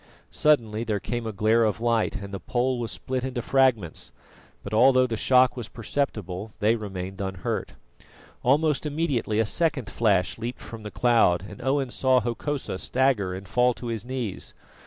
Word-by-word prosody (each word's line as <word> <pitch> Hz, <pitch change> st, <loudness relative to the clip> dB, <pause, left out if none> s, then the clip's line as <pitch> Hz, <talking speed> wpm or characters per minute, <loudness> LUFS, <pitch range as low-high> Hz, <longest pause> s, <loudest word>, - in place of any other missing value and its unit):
Suddenly 115 Hz, -8 st, +2 dB
there 110 Hz, -3 st, -1 dB
came 120 Hz, +1 st, -4 dB
a -, -, -2 dB
glare 110 Hz, +3 st, +3 dB
of 110 Hz, 0 st, 0 dB
light, 115 Hz, -1 st, +1 dB
and 100 Hz, 0 st, -7 dB
the 100 Hz, -, -4 dB
pole 125 Hz, +3 st, -1 dB
was 115 Hz, -2 st, -2 dB
split 130 Hz, -1 st, -3 dB
into 125 Hz, -2 st, -3 dB
fragments; 130 Hz, -11 st, +1 dB, 0.5 s
but 100 Hz, -, -7 dB
although 130 Hz, +3 st, +5 dB
the 115 Hz, -2 st, -2 dB
shock 125 Hz, +2 st, +4 dB
was 120 Hz, -3 st, -6 dB
perceptible, 110 Hz, -5 st, -3 dB
they 110 Hz, +1 st, +3 dB
remained 95 Hz, -3 st, -6 dB
unhurt. 95 Hz, -2 st, -3 dB, 0.7 s
Almost 150 Hz, +2 st, +2 dB
immediately 145 Hz, -8 st, -1 dB
a 110 Hz, -, +3 dB
second 140 Hz, -2 st, 0 dB
flash 100 Hz, -4 st, +1 dB
leaped 120 Hz, +2 st, -4 dB
from 115 Hz, -1 st, -9 dB
the 105 Hz, -, -6 dB
cloud, 110 Hz, -7 st, +3 dB
and 125 Hz, -, -11 dB
Owen 135 Hz, 0 st, 0 dB
saw 130 Hz, 0 st, +3 dB
Hokosa 120 Hz, -2 st, -3 dB
stagger 120 Hz, -9 st, +1 dB
and 95 Hz, +1 st, -8 dB
fall 125 Hz, +3 st, +2 dB
to 120 Hz, -, -6 dB
his 110 Hz, -, -4 dB
knees. 125 Hz, -5 st, -5 dB
115 Hz, 170 wpm, -26 LUFS, 105-130 Hz, 0.7 s, although